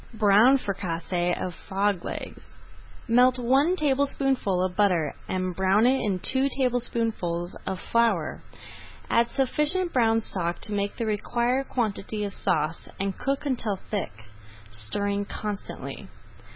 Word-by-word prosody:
BROWN 215 +5 +6
FRICASSÉE 175 -4 -2
OF 180 - -3
FROG 195 +1 -1
LEGS - - -6 0.7
Melt 250 +2 +5
one 270 +8 +3
tablespoonful 270 - +1
of 185 -1 -2
butter 180 -7 +2 0.2
and 185 -1 -2
brown 190 +4 +3
in 245 -6 +2
it 185 - -8
two 265 +1 +2
tablespoonfuls 230 -9 -1
of 190 -1 -2
flour. 225 -9 +1 0.7
Add 235 0 +3
sufficient 300 +8 0
brown 225 -3 +3
stock 175 -5 -2
to 210 - -2
make 200 0 -1
the 230 - -1
required 240 +5 0
quantity 215 -3 -2
of 200 -1 -3
sauce 160 -2 -1
and 195 -1 -1
cook 275 +1 -1
until 235 -7 -1 0.2
thick, 110 - -4 0.5
stirring 200 - +1
constantly. 205 0 -6
210 Hz, 125 wpm, -26 LUFS, 185-250 Hz, 0.7 s, BROWN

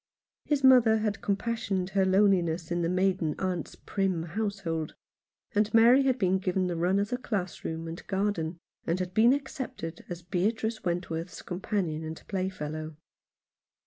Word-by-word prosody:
His 290 -2 0
mother 245 -4 +7
had 215 -2 -2
compassionated 200 -3 -1
her 195 -1 +3
loneliness 185 -4 +2
in 175 0 0
the 165 - 0
maiden 180 -4 +1
aunt's 185 -3 -3
prim 190 -4 -1
household; 175 -3 -3 0.6
and 210 0 +2
Mary 240 +4 +7
had 260 -1 +2
been 190 -4 +2
given 185 0 0
the 175 -1 -1
run 175 +3 +2
of 200 +1 0
the 245 - 0
schoolroom 180 -7 -3
and 165 +1 -8
garden, 190 -5 -1 0.3
and 170 +2 +1
had 180 0 -3
been 225 +5 +6
accepted 260 - -4
as 175 -1 -6
Beatrice 215 +5 -1
Wentworth's 170 -1 -3
companion 175 -3 -2
and 160 0 -6
playfellow. 155 -5 -4
185 Hz, 145 wpm, -29 LUFS, 170-210 Hz, 0.6 s, mother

